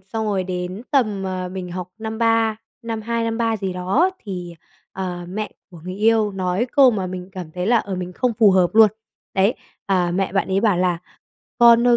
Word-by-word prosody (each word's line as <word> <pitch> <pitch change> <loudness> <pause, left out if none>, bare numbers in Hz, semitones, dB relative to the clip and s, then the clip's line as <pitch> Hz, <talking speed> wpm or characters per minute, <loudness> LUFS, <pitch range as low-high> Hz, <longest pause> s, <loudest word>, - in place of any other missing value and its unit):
xong 220 +3 -4
rồi 195 -3 0
đến 180 +3 -4
tầm, 215 -8 +1
ờ, 185 -1 -3
mình 185 -2 -5
học 180 -1 -5
năm 220 0 -5
3, 225 -1 +2 0.3
năm 225 -1 -4
2 230 +1 -1
năm 225 0 -2
3 225 -1 +1
gì 195 -3 -3
đó 195 - +2
thì, 180 -4 -7 0.4
ờ, 180 -2 -4
mẹ 210 +3 -4 0.2
của 170 - -12
người 185 - -5
yêu 215 0 +2
nói 185 +4 -1
câu 270 -3 +7
mà 195 -5 -2
mình 180 0 -6
cảm 180 -4 -7
thấy 180 +2 -3
là, 235 +2 +4
ờ, 200 -3 -4
mình 180 0 -5
không 245 +5 0
phù 215 -4 +7
hợp 185 -2 +3
luôn. 220 -1 +8 0.5
Đấy, 195 +5 +3 0.3
à 180 -3 +2
mẹ 190 0 0
bạn 195 - 0
ấy 190 +1 +1
bảo 210 -5 +3
là 180 -1 +1 0.6
"Con 235 0 +7
ơi 240 -1 +6
195 Hz, 215 wpm, -21 LUFS, 180-225 Hz, 0.6 s, luôn